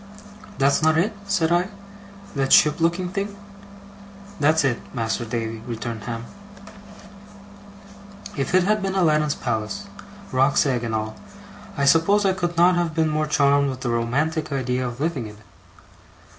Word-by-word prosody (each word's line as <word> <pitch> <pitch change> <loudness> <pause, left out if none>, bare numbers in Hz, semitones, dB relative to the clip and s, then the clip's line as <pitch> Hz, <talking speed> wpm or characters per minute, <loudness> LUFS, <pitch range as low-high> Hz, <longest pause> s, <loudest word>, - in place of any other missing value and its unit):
'That's 140 +2 +3
not 160 0 +3
it?' 200 +7 +1
said 180 -5 +1
I. 175 +2 +2 0.7
'That 135 -1 0
ship 150 +2 +5
looking 170 +2 +1
thing?' 200 +2 -4 1.0
'That's 155 +2 +3
it, 125 -4 +1 0.2
Mas'r 115 0 -2
Davy,' 115 -1 -3
returned 115 -2 -5
Ham. 115 -1 -5 2.1
If 140 +5 -1
it 185 - +5
had 210 +2 +1
been 195 0 -2
Aladdin's 155 -5 +2
palace, 120 - -3 0.5
roc's 135 +3 +3
egg 125 -4 0
and 115 -1 -2
all, 110 0 -3 0.6
I 140 - +1
suppose 180 +8 +4
I 190 - +3
could 175 -2 -3
not 175 +2 +5
have 170 -2 -1
been 160 -1 +2
more 155 0 0
charmed 140 -1 +3
with 130 -1 -6
the 120 - -1
romantic 145 +8 -1
idea 130 -2 -1
of 120 0 -7
living 145 -7 -2
in 105 - -11
it. 105 0 -20
145 Hz, 155 wpm, -23 LUFS, 120-170 Hz, 2.1 s, ship